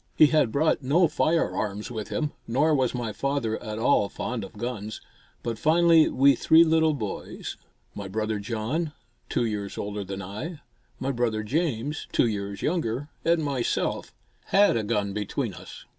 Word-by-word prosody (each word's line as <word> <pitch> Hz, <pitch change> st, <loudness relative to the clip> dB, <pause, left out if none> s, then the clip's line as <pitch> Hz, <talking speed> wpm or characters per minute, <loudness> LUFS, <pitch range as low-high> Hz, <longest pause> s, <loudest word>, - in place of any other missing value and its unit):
He 155 Hz, -, +8 dB
had 150 Hz, -6 st, +3 dB
brought 150 Hz, +3 st, +2 dB
no 155 Hz, +7 st, +4 dB
firearms 125 Hz, -10 st, 0 dB
with 110 Hz, -3 st, -4 dB
him, 150 Hz, -3 st, -2 dB, 0.2 s
nor 145 Hz, +7 st, +2 dB
was 130 Hz, -3 st, +1 dB
my 115 Hz, -3 st, -3 dB
father 135 Hz, -3 st, -1 dB
at 110 Hz, -2 st, -5 dB
all 110 Hz, -3 st, +3 dB
fond 120 Hz, -3 st, -4 dB
of 95 Hz, -, -10 dB
guns, 110 Hz, -2 st, -4 dB, 0.4 s
but 115 Hz, -2 st, -3 dB
finally 165 Hz, +3 st, +5 dB
we 140 Hz, +2 st, +5 dB
three 160 Hz, +6 st, +6 dB
little 160 Hz, -1 st, +3 dB
boys, 105 Hz, -7 st, -5 dB, 0.4 s
my 100 Hz, -1 st, -6 dB
brother 110 Hz, +1 st, -2 dB
John, 120 Hz, +10 st, -2 dB, 0.4 s
two 120 Hz, -, +1 dB
years 105 Hz, -3 st, -3 dB
older 105 Hz, 0 st, -3 dB
than 95 Hz, 0 st, -6 dB
I, 145 Hz, -, -6 dB, 0.4 s
my 135 Hz, +1 st, -1 dB
brother 115 Hz, -4 st, 0 dB
James, 145 Hz, +2 st, -1 dB
two -, -, +3 dB
years 100 Hz, -3 st, -3 dB
younger, 145 Hz, -4 st, -1 dB
and 165 Hz, -1 st, +2 dB
myself, 135 Hz, -4 st, -1 dB, 0.3 s
had 200 Hz, -6 st, +4 dB
a 115 Hz, -, +1 dB
gun 105 Hz, -2 st, -1 dB
between 105 Hz, -1 st, -2 dB
us. -, -, -11 dB
120 Hz, 160 wpm, -26 LUFS, 105-155 Hz, 0.4 s, He